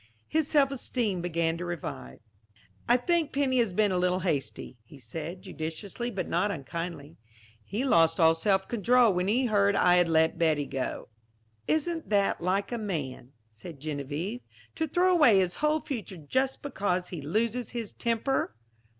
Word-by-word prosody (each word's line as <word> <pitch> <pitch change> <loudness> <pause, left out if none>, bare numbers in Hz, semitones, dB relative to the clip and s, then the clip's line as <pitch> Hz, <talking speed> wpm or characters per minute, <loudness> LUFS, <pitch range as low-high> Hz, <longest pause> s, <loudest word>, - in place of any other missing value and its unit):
His 315 -2 0
self 280 -3 +3
esteem 235 -8 -1
began 165 -1 -1
to 180 - -4
revive. 165 - -6 0.7
"I 240 - +6
think 330 +3 0
Penny 270 -2 +1
has 230 -5 +2
been 205 +2 +2
a 180 - +1
little 180 +1 +1
hasty," 145 -7 -3
he 130 +6 -15
said, 160 +9 -7
judicially 185 +9 -5
but 200 -5 -4
not 210 - +1
unkindly. 165 -2 -6 0.5
"He 210 - -3
lost 165 -9 +4
all 160 -1 +6
self 190 +3 +1
control 240 0 +3
when 180 +1 0
he 245 +6 +2
heard 205 -3 +3
I 180 0 +5
had 175 -1 +3
let 160 +1 +2
Betty 155 -3 +2
go." 135 -3 -4 0.6
"Isn't 325 +1 -1
that 200 -4 +2
like 190 +5 0
a 240 - -2
man," 140 - -5 0.2
said 140 +7 -11
Geneviève, 155 - -4 0.3
"to 320 - -2
throw 360 +5 +3
away 295 - +6
his 185 -2 +2
whole 305 +1 +1
future 210 - -6
just 260 - -1
because 185 -9 -1
he 170 -4 -6
loses 225 - -1
his 230 -4 -5
temper?" 235 - -1
190 Hz, 165 wpm, -28 LUFS, 165-245 Hz, 0.7 s, I